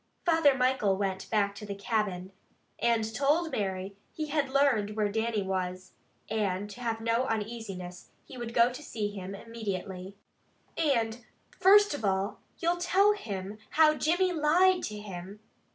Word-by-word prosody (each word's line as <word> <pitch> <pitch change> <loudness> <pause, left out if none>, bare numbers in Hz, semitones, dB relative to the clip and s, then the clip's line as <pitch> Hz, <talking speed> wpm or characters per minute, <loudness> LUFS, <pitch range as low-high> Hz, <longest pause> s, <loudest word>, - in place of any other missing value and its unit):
Father 325 -5 +4
Michael 250 -7 +2
went 190 -1 -3
back 200 -2 +1
to 200 - -10
the 205 -1 -5
cabin, 200 -3 -2 0.5
and 225 -2 +1
told 300 +7 +1
Mary 190 -1 -3 0.2
he 310 -1 -4
had 290 -2 0
learned 260 -7 +2
where 210 -2 0
Dannie 220 -1 0
was, 185 -1 -3 0.4
and 205 -2 -1
to 245 - -10
have 225 -2 -2
no 230 +3 +1
uneasiness, 205 -5 -5
and - - -36
he - - -10
would 240 -2 -5
go 235 +1 +4
to 255 - -8
see 215 -7 -3
him 195 -1 -6
immediately. 195 -4 -6 0.6
"And 240 -7 0 0.3
first 410 0 +5
of 290 - -5
all 195 +1 0 0.2
you'll 345 0 +1
tell 390 +4 +4
him 205 - -6 0.2
how 315 -1 +7
Jimmy 350 +4 +1
lied 355 +4 +4
to 210 - -5
him?" 195 -1 -8
220 Hz, 155 wpm, -29 LUFS, 200-280 Hz, 0.6 s, how